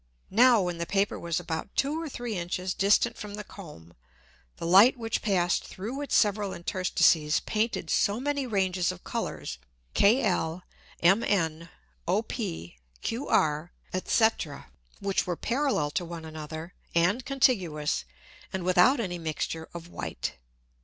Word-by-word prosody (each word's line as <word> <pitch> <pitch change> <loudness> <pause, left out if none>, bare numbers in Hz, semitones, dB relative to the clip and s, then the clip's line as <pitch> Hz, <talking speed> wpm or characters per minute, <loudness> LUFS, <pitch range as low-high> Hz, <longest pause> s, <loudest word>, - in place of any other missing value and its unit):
Now, 235 0 +6
when 175 -1 -3
the 170 - -2
Paper 200 0 0
was 170 -1 -1
about 165 +2 -5
two 295 +4 0
or 325 - -4
three 240 -4 -4
Inches 180 +1 -2
distant 210 +4 +2
from 205 -1 -6
the 210 - -6
Comb, 150 - -12 0.6
the - - -5
Light 200 +10 +7
which 225 -1 -2
passed 180 -5 +1
through 230 +9 -6
its 285 - -1
several 205 -2 +2
Interstices 170 -3 +2
painted 215 -6 -1
so 205 +3 +2
many 285 0 -1
Ranges 185 -4 +1
of 180 -1 -11
Colours, - - -4 0.3
kl, 200 -6 +2 0.4
mn, 170 -4 +2 0.4
op, - - +1
qr, 85 - -2 0.4
&c. 225 -1 +4 0.6
which 195 -2 0
were 175 -2 -1
parallel 250 - 0
to 175 - -1
one 165 -1 -7
another, 160 +2 -7 0.2
and 180 +9 +3
contiguous, 190 - +1 0.5
and 190 -1 -3
without 185 +10 +5
any 180 -6 -3
Mixture 160 0 -3
of 170 0 -8
white. 175 - -5
185 Hz, 135 wpm, -28 LUFS, 165-225 Hz, 0.6 s, Light